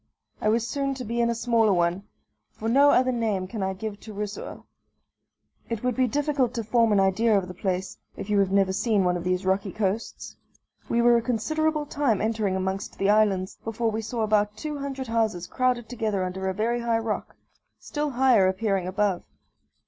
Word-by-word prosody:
I 215 - +2
was 230 +1 +1
soon 275 0 -2
to 255 -1 -6
be 235 +2 -1
in 235 - +2
a 235 - 0
smaller 230 -2 +2
one 175 +2 0 0.5
for 220 - -5
no 280 +5 +5
other 255 -1 +4
name 220 -6 -1
can 215 +2 -5
I 190 0 -1
give 205 +1 -6
to 215 - -10
Rusoer. 210 0 -6 1.1
It 230 -1 -3
would 250 -2 0
be 255 -1 +2
difficult 275 -1 0
to 230 - -2
form 230 +1 +2
an 205 - +4
idea 205 +3 +3
of 190 -2 -1
the 180 - -7
place, 185 0 -3 0.2
if - - -6
you 205 -1 +2
have 195 -1 +2
never 195 -1 +3
seen 210 0 +1
one 180 -1 +2
of 175 - -4
these 180 +1 -1
rocky 190 +1 0
coasts. 210 +2 -3 0.5
We 235 0 +2
were 240 0 +6
a - - +1
considerable 300 +7 0
time 280 -8 0
entering 215 -3 0
amongst 190 +1 -3
the 195 +1 +2
islands, 200 -3 +1
before 225 0 -1
we 220 +1 -2
saw 225 +1 -4
about 210 -1 +1
two 300 -2 -5
hundred 270 -1 -4
houses 220 -6 0
crowded 250 -1 0
together 220 -5 -2
under 190 +1 -3
a - - -1
very 230 +3 0
high 235 -1 +1
rock 225 -2 -3 0.4
still 295 0 -3
higher 250 -7 +4
appearing 190 -1 0
above. 195 -1 0
220 Hz, 200 wpm, -25 LUFS, 195-240 Hz, 1.1 s, were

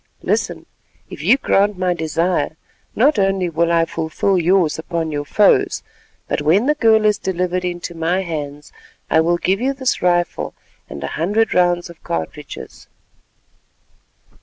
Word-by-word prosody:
Listen: - - -1 0.5
if - - -8
you 210 - +4
grant 205 -6 +1
my 180 -1 +1
desire, 160 -1 -1 0.4
not 255 0 +3
only 195 -2 +1
will 170 +1 +1
I 165 -1 +3
fulfil 165 +4 -1
yours 175 -2 +2
upon 165 -1 -3
your 145 -1 -3
foes, 205 +6 +3 0.4
but - - -1
when 170 +10 +3
the 300 - +3
girl 220 -6 +3
is 210 -1 +3
delivered 180 -1 -1
into 175 -1 -4
my 170 +3 0
hands 150 -4 -6 0.4
I 160 - +5
will 170 +1 +2
give 190 +4 0
you 270 +2 0
this 260 -2 -1
rifle 175 -1 0 0.3
and 70 0 -7
a - - -2
hundred 210 +6 +1
rounds 175 -1 +2
of 170 -1 -14
cartridges." 80 -1 -6
175 Hz, 150 wpm, -19 LUFS, 160-195 Hz, 0.5 s, I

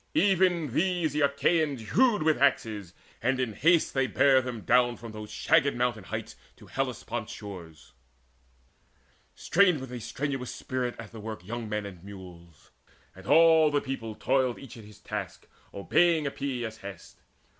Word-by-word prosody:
Even 180 - +2
these 175 -3 +1
the 150 - 0
Achaeans 140 -4 +1
hewed 235 -8 +3
With 155 -4 +2
axes, 110 -9 0 0.3
and 130 +2 +1
in 125 -4 -1
haste 165 - +3
they 135 -1 +1
bare 135 -1 +4
them 125 -3 -6
down 120 0 +3
From 115 +1 -9
those 105 -1 -8
shagged 145 +4 +2
mountain 120 -5 -1
heights - - -6 0.2
to - - -16
Hellespont's - - -4
shores. 85 -9 -10 1.4
Strained 180 -4 +3
with 130 -1 -8
a 125 - -5
strenuous 135 +2 -4
spirit 125 -2 -3
at 115 -2 -10
the 115 - -10
work 110 -3 -7
Young 115 +1 -5
men 105 -1 -2
and 90 -3 -10
mules; 90 -5 -13 0.4
and 95 +1 -13
all 160 -1 +6
the 145 -1 +1
people 125 -6 -5
toiled 130 0 +1
Each 135 -5 -11
at 115 -3 -12
his 105 0 -15
task - - -6 0.2
obeying 160 - +2
Epeius's 125 -5 -4
hest. 100 -3 -11
125 Hz, 155 wpm, -28 LUFS, 105-150 Hz, 1.4 s, all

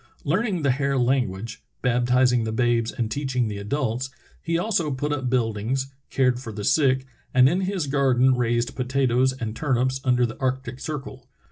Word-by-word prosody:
Learning 185 +2 0
the 140 - +3
Hare 140 +1 0
language, 115 -3 -1 0.2
baptizing 125 0 +3
the 110 - -2
babes 120 0 +1
and 115 -2 -3
teaching 130 -3 -1
the 105 -1 -4
adults, 125 +3 -2 0.3
he 165 0 0
also 175 -4 0
put 145 +2 -2
up 130 -3 -2
buildings, 125 +2 -1 0.2
cared 125 -2 +2
for 120 -3 -7
the 105 -1 -6
sick, 130 0 +3 0.3
and 130 0 +7
in 175 +7 +1
his 190 -3 -1
garden 130 -2 +3
raised 120 -1 0
potatoes 130 0 +1
and 115 -4 -5
turnips 130 -1 0
under 125 -2 +3
the 115 - -6
arctic 130 0 -2
circle. 135 -4 -6
130 Hz, 165 wpm, -24 LUFS, 120-140 Hz, 0.3 s, and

